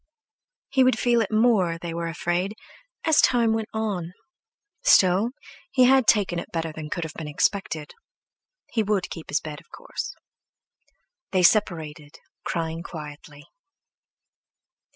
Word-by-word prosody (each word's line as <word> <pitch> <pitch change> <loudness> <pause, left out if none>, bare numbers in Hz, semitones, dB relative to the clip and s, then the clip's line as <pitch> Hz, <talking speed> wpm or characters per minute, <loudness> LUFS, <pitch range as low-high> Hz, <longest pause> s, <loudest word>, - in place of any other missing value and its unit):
He 265 -1 +4
would 255 -3 +3
feel 240 0 +3
it 220 - -2
more, 215 -7 +3
they 165 0 -6
were 170 0 -3
afraid, 175 +4 -2 0.5
as 320 -2 +5
time 235 -3 +3
went 225 -1 -2
on. 200 -6 -3 0.7
Still, 195 - +5 0.4
he 255 - +4
had 260 -1 +5
taken 195 -6 +3
it - - -8
better 165 -1 -2
than 155 -1 -7
could 170 - -3
have 160 -1 -6
been 160 - -7
expected. 155 0 -1 0.8
He 225 - +1
would 210 -2 -1
keep 165 - -8
his - - +1
bed, 150 -1 -7
of - - -28
course! - - -6 1.1
They 185 -2 +1
separated, 160 -6 +1 0.3
crying 165 0 -3
quietly. 150 -2 -10
180 Hz, 135 wpm, -25 LUFS, 165-220 Hz, 1.1 s, as